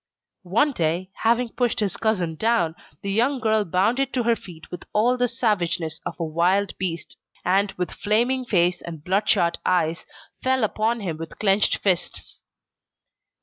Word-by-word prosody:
One 230 +10 +3
day, 175 - -1
having 235 +2 +2
pushed 240 0 0
his 205 -4 0
cousin 195 -7 0
down, 220 -4 +1 0.3
the 200 - -2
young 245 +6 +2
girl 220 -3 +2
bounded 220 +9 +1
to 250 - +1
her 230 0 +3
feet 165 -6 -13
with 180 - -7
all 235 +4 +3
the 245 0 +1
savageness 175 -9 -1
of - - -7
a - - -1
wild 180 +5 +1
beast, 170 -3 -4 0.3
and, 195 +2 +2
with 180 0 -3
flaming 240 +5 +1
face 180 -6 +1
and 165 -3 -8
bloodshot 190 -2 +2
eyes, 170 -2 0 0.3
fell 260 -1 +1
upon 220 +2 0
him 170 -6 -3
with 165 0 -8
clenched 200 0 +2
fists. 180 -3 -2
200 Hz, 155 wpm, -24 LUFS, 175-230 Hz, 0.3 s, One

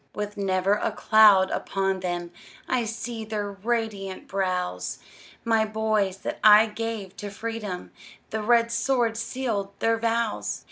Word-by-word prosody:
With 210 0 -4
never 190 -1 +1
a 210 - 0
cloud 210 -3 +5
upon 195 -1 -1
them, 175 -1 -3 0.4
I 250 -2 0
see 230 +1 -5
their 210 -2 -3
radiant 200 -2 -3
brows; 180 - -2 0.5
My 225 -1 +3
boys 215 -3 0
that - - -3
I 215 0 +8
gave 220 -3 -5
to 205 - -5
freedom, 210 -3 -5 0.4
The 220 - -2
red 235 +1 +3
sword 235 -1 +1
sealed 230 -4 -3
their 225 0 +1
vows! 230 -1 -1
215 Hz, 135 wpm, -25 LUFS, 195-230 Hz, 0.5 s, I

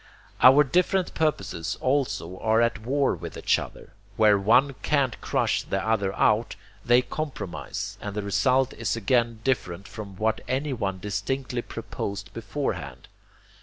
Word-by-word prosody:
Our 135 +3 +8
different 180 +6 +1
purposes 150 - -1
also 105 -10 -1
are 110 0 +2
at 115 -1 +2
war 135 +5 +1
with 85 -1 -7
each - - +2
other. - - -10 0.2
Where 105 -2 +6
one 125 +8 +4
can't 140 -5 0
crush - - +1
the 95 - -2
other 100 -4 +1
out, 110 +2 +2 0.3
they 120 +1 +4
compromise; 140 - -5
and 105 -1 -5
the 105 - -2
result 130 +6 +2
is 115 -2 -2
again 115 0 +1
different 100 -7 -1
from 100 -2 -8
what 110 +2 0
anyone 130 -8 -1
distinctly 115 +6 -3
proposed 100 -3 -6
beforehand. 95 - -4
115 Hz, 135 wpm, -26 LUFS, 100-130 Hz, 0.3 s, Our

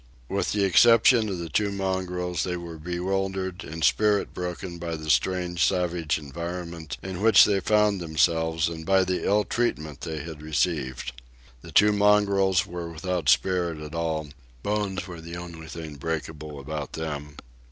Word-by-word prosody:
With 100 - -1
the 105 -1 +1
exception 115 +4 +6
of 95 - -3
the 85 -1 -5
two 100 +6 0
mongrels, 90 -3 -2
they 90 -1 -2
were 85 -2 -8
bewildered 95 +2 -2
and 80 +1 -6
spirit 105 -1 +3
broken 90 0 -5
by 85 -1 -3
the 80 -1 -2
strange 85 +6 +1
savage 90 -4 +1
environment 85 0 -6
in 95 0 -5
which 110 -2 +8
they 100 -2 +2
found 105 -1 +2
themselves 80 0 +1
and 80 -1 -5
by 95 +2 +4
the 90 0 -1
ill 105 +1 +3
treatment 80 - -2
they 80 -2 -4
had 80 -2 -8
received. 75 -5 -1 0.5
The - - -11
two 105 +1 +6
mongrels 100 -2 +3
were 85 -2 -6
without 85 -2 -2
spirit 85 0 +2
at 75 0 -8
all; 80 -2 -2 0.3
bones 100 -3 -1
were 85 -3 -8
the 85 +1 -8
only 85 -2 -8
things 80 -3 -8
breakable 75 -1 -4
about 75 0 -5
them. 75 -2 -5
85 Hz, 160 wpm, -26 LUFS, 80-95 Hz, 0.5 s, which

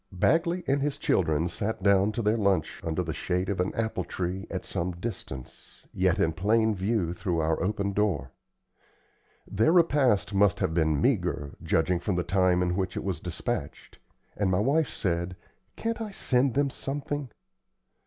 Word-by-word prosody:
Bagley 170 - +1
and 140 +1 +1
his 145 0 -1
children 80 -2 +1
sat 100 +3 -3
down 100 +1 +4
to 115 - -2
their 105 +2 +3
lunch 100 -7 0
under 80 +2 -1
the 80 -2 -3
shade 90 +1 -1
of 100 - -2
an 90 - +1
apple 110 -4 -1
tree 90 +2 -4
at - - -4
some 90 +1 -2
distance, 85 - -8
yet - - +2
in 80 - +2
plain 110 +5 +2
view 95 -3 0
through 90 -1 -2
our 80 0 0
open 100 0 -1
door. 90 -11 0 1.1
Their 110 +10 +2
repast 135 - +3
must 100 -1 +3
have 80 - 0
been 80 -3 +2
meagre, 70 -1 0
judging 85 +2 +1
from 95 +1 -1
the 90 - 0
time 90 0 +2
in 90 0 0
which 95 -1 -2
it - - -3
was 95 -5 -2
despatched, 90 - -5 0.4
and 100 -2 0
my 90 0 +2
wife 140 +7 +2
said, 85 -1 -2 0.4
"Can't 230 0 -3
I 220 - -3
send 130 - +1
them 140 0 +2
something?" 145 0 -4
95 Hz, 170 wpm, -28 LUFS, 90-115 Hz, 1.1 s, down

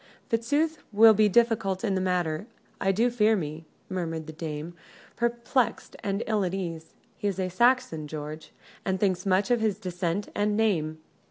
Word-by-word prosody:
"Fitzooth 290 +8 +1
will 220 +2 +8
be 215 0 +4
difficult 210 -4 +2
in 205 -4 +1
the 190 - 0
matter, 180 0 -1 0.3
I 195 - +2
do 230 +5 +2
fear 220 -2 +3
me," 155 -3 -4 0.2
murmured 165 -4 -3
the 155 - -8
dame, 155 +1 -5 0.4
perplexed 235 +1 0
and 200 +2 -1
ill 215 -2 +1
at 180 0 -1
ease. 165 -4 -5 0.2
"He 205 - -2
is 195 -2 -2
a 185 -1 0
Saxon, 235 -6 +2
George, 155 +1 -7 0.3
and 190 0 -1
thinks 185 -1 0
much 190 +3 +2
of 240 -2 +3
his 215 -3 +1
descent 180 -1 -3
and 205 0 +1
name. 165 -8 +1
195 Hz, 170 wpm, -27 LUFS, 170-220 Hz, 0.4 s, will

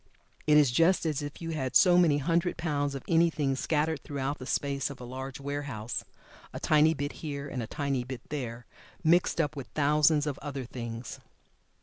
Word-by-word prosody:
It 150 0 +6
is 145 -4 +5
just 165 +7 +3
as 155 -2 0
if 145 +3 -7
you 165 - -3
had 135 -5 -3
so 180 -2 +7
many 170 -5 +5
hundred 170 +4 0
pounds 145 -4 -1
of 135 - -6
anything 160 -5 +2
scattered 155 +2 0
throughout 140 0 -3
the 130 - -8
space 140 -1 -1
of 140 - -9
a - - -8
large 130 +2 -6
warehouse, 140 -5 -4 0.5
a - - -6
tiny 155 +1 +4
bit 145 0 -3
here, 145 -2 -4
and 130 -3 -4
a 110 - -4
tiny 140 -2 -1
bit 125 -1 -8
there, 120 -5 -5 0.4
mixed 170 +1 +3
up 155 -2 0
with 135 -3 -6
thousands 150 0 +3
of 145 -2 -3
other 140 -3 -5
things. 115 -1 -6
145 Hz, 190 wpm, -29 LUFS, 130-155 Hz, 0.5 s, so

